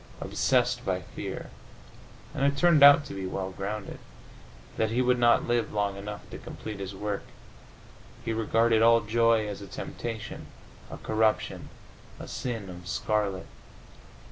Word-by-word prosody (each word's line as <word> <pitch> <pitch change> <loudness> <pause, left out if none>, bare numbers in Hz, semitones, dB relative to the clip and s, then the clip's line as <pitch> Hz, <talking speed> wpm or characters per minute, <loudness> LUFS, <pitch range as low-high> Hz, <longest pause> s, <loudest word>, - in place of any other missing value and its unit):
Obsessed - - +1
by - - 0
the - - -10
fear - - -7 0.8
and 135 - -2
it 140 0 +2
turned 170 -3 +5
out 145 +1 +9
to - - -8
be 95 -1 -4
well 95 0 -3
grounded 100 +2 -5 0.8
that 110 - +1
he 115 +3 0
would 125 -1 +3
not 120 -1 +4
live 120 -2 +1
long 100 -1 -1
enough 105 +1 -7
to - - -7
complete 105 -2 -8
his 95 0 -6
work, 105 0 -3 1.0
he 115 - -1
regarded 115 0 +2
all 115 0 +6
joy 115 0 +2
as 100 -1 -6
a 100 - -8
temptation, 115 +4 -6 0.4
a - - -7
corruption, 110 0 0 0.5
a - - -8
sin 115 -6 -4
of 90 -1 -10
scarlet. 100 -1 -1
110 Hz, 150 wpm, -28 LUFS, 100-115 Hz, 1.0 s, out